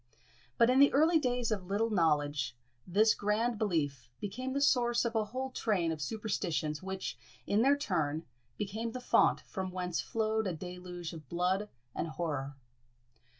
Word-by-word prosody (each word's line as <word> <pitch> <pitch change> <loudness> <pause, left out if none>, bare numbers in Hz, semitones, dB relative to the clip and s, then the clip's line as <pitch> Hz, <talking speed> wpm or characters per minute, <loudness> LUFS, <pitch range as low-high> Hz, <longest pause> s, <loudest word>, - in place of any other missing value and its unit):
But 235 +2 +5
in 260 - +4
the 280 - +7
early 320 +4 +5
days 245 -4 0
of 195 -4 -2
"little 215 +4 0
knowledge" 145 - +1 0.3
this 215 +5 +4
grand 215 +2 0
belief 155 - -1
became 255 +6 -4
the 280 - +1
source 240 -4 +3
of 235 - -1
a 220 -2 +1
whole 260 +5 -4
train 190 -9 0
of 155 -1 -4
superstitions, 175 -6 -2
which, 190 0 -5 0.3
in 205 +2 +2
their 280 +3 +5
turn, 160 - -1 0.3
became 220 +3 -3
the 255 - -4
fount 250 - +3
from 190 -1 -5
whence 180 -2 -2
flowed 220 -1 0
a 185 - -1
deluge 180 0 -7
of 155 -5 -10
blood 185 +4 0 0.2
and - - -2
horror. 150 -4 -3
200 Hz, 160 wpm, -32 LUFS, 170-230 Hz, 0.3 s, the